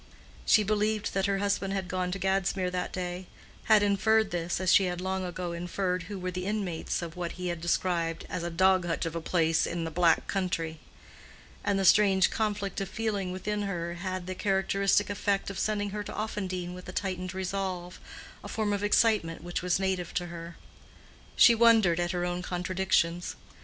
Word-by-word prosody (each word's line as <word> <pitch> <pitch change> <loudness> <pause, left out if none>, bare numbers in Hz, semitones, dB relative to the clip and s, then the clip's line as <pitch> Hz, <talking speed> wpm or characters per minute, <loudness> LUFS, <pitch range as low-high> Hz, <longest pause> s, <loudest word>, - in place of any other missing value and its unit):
She 215 - +6
believed 210 +1 0
that 195 0 +1
her 200 -1 +1
husband 200 -1 0
had 190 -2 -2
gone 180 0 -2
to 195 - -2
Gadsmere 190 -1 0
that 180 0 -2
day—had 185 +4 -1
inferred 215 +1 +3
this, 175 0 -2
as 185 -1 +3
she 195 - +6
had 180 -1 -2
long 190 +1 -2
ago 180 -1 -4
inferred 180 +1 -2
who 205 - -5
were 185 0 -3
the 180 +1 -4
inmates 195 -5 -2
of 165 -1 -7
what 175 -1 -4
he 180 -1 -4
had 170 -2 -4
described 170 -1 0
as - - -4
"a 170 - -3
dog 185 +1 +3
hutch 165 0 -1
of 165 0 -4
a 165 - -2
place 165 -1 +2
in 170 -1 -3
a 165 - -4
black 170 0 +3
country;" 165 -5 -2 0.8
and 200 - +1
the 195 - +1
strange 195 -1 +5
conflict 205 -3 -2
of 195 - -3
feeling 205 -3 -2
within 210 +3 -3
her 175 -4 -3
had 185 +2 -4
had 185 -1 -4
the 185 - -4
characteristic 195 +1 +1
effect 200 -1 -1
of 195 - -6
sending 205 -1 -1
her 210 +1 -3
to - - -7
Offendene 185 -4 -3
with 180 0 -9
a - - -4
tightened 185 -1 -3
resolve—a 185 -1 -5
form 215 -2 -1
of 200 0 -2
excitement 205 -6 +2
which 175 0 -3
was 180 0 +1
native 190 -3 -2
to 175 - 0
her. 170 0 -8 0.8
She 235 - +8
wondered 225 -7 +5
at 175 0 0
her 175 0 -1
own 175 0 -2
contradictions. 180 -1 0
185 Hz, 190 wpm, -29 LUFS, 175-200 Hz, 0.8 s, She